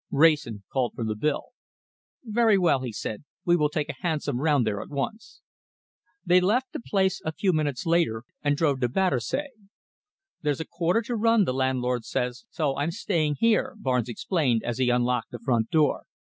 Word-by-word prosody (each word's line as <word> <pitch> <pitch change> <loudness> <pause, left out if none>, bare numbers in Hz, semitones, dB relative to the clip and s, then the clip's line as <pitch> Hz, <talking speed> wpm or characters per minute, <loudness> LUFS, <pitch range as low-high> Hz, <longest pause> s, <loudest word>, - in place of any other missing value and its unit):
Wrayson 140 -9 +3
called 130 -3 0
for 115 - -4
the 110 -1 -1
bill. 145 +7 -1 0.7
"Very 225 -2 +3
well," 165 -8 +3
he 125 -2 -4
said, 105 +2 -5 0.2
"we 175 - +4
will 150 -3 +2
take 150 0 -2
a - - -4
hansom 150 -7 -1
round 145 -5 +3
there 105 -2 -1
at - - -9
once." 215 - -5 0.8
They 180 +1 +5
left 240 +8 +1
the - - -4
place 190 -4 0
a 160 - -2
few 185 +4 0
minutes 145 -5 -1
later, 165 -10 +1 0.2
and 145 -1 +1
drove 145 -4 +1
to 125 -2 +1
Battersea. 185 - 0 0.9
"There's 145 -3 0
a 160 - -3
quarter 180 +6 0
to 240 +2 -3
run, 225 -1 +3
the 130 - -1
landlord 125 -2 0
says, 125 - -3
so 150 -5 -1
I'm 145 +3 0
staying 165 -6 0
here," 230 -1 +2
Barnes 125 - 0
explained, 125 - 0
as 120 +1 -3
he 130 -1 +3
unlocked 125 0 +1
the 120 - -7
front 115 -1 0
door. 155 -2 +2
150 Hz, 185 wpm, -26 LUFS, 125-180 Hz, 0.9 s, They